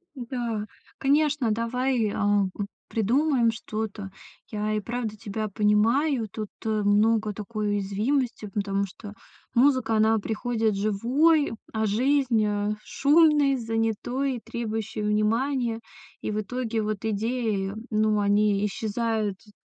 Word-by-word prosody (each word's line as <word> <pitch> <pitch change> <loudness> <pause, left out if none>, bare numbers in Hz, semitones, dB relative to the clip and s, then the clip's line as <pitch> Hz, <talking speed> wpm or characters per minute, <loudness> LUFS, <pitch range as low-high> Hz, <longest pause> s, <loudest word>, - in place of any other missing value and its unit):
Да, 235 -4 -3 0.3
конечно, 285 -3 +2
давай, 230 0 0
а, 205 -1 +2
п 205 - -2 0.2
придумаем 240 +2 +2
что-то. 215 -2 -5 0.4
Я 215 0 -2
и 215 - +1
правда 225 0 -4
тебя 215 +1 -4
понимаю, 225 +6 +2
тут, 215 0 -5 0.2
э, 220 - 0
много 215 +1 +3
такой 210 +1 -4
уязвимости, 215 +5 -1
потому 200 -1 0
что 205 +2 -10 0.4
музыка 255 -2 +3
она 220 +1 +4
приходит 225 0 -1
живой, 250 +10 +2 0.2
а, 220 0 0
жизнь, 245 0 +2
а, 205 0 0
шумной, 295 -2 +4
занятой, 230 +3 -1
требующей 220 -2 -4
внимания. 225 +3 0 0.4
И - - -3
в 210 - -1
итоге 230 +1 -2
вот 215 -1 -3
идеи, 220 -2 -1 0.2
ну 215 -1 +2
они 205 0 +2
исчезают 215 -1 -1
т 210 +1 -21
220 Hz, 120 wpm, -26 LUFS, 210-245 Hz, 0.4 s, она